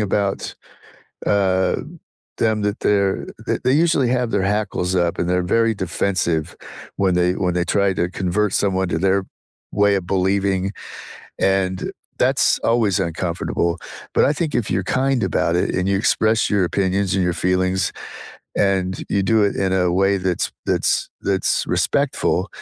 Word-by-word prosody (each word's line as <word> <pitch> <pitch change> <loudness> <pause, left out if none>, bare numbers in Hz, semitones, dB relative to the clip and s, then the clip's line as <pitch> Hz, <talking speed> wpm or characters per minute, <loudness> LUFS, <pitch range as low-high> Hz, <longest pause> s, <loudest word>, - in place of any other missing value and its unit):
about, 100 -1 0 0.9
uh, 95 -2 +2 0.7
them 110 -1 +2
that 105 - -2
they're 100 -2 +1 0.2
th - - 0
they 130 - +4
usually 140 -7 +2
have 125 -2 -1
their 100 -2 +1
hackles 105 -4 -2
up 85 - -1
and - - 0
they're 90 0 +1
very 115 -1 +3
defensive 85 -3 0 0.6
when 95 -2 +3
they 90 0 +3
when 90 -1 +1
they 90 - 0
try 100 -1 +3
to 85 - +2
convert 95 +3 0
someone 95 -2 +1
to - - 0
their 95 +1 +3 0.6
way 100 0 +5
of 90 - -11
believing, 95 0 +1 1.0
and 95 -1 -2 0.5
that's - - +2
always 110 -6 +2
uncomfortable, 85 0 -2 0.4
but - - +4
I - - +1
think 160 -3 -1
if 120 - +1
you're 95 +1 0 0.2
kind 135 -3 +1
about 85 - +1
it - - -1
and 90 +1 0
you 100 - +2
express 110 0 +2
your 100 -3 +2
opinions 95 0 0
and 95 - +1
your 90 - 0
feelings 95 +1 +1 0.8
and 95 -2 +1 0.2
you 100 - +2
do 110 - +5
it - - -6
in 95 - 0
a 90 -2 +2
way 95 +1 +3
that's 90 -2 0 0.2
that's - - +1 0.2
that's 95 -1 +1
respectful, - - 0
95 Hz, 160 wpm, -20 LUFS, 90-105 Hz, 1.0 s, way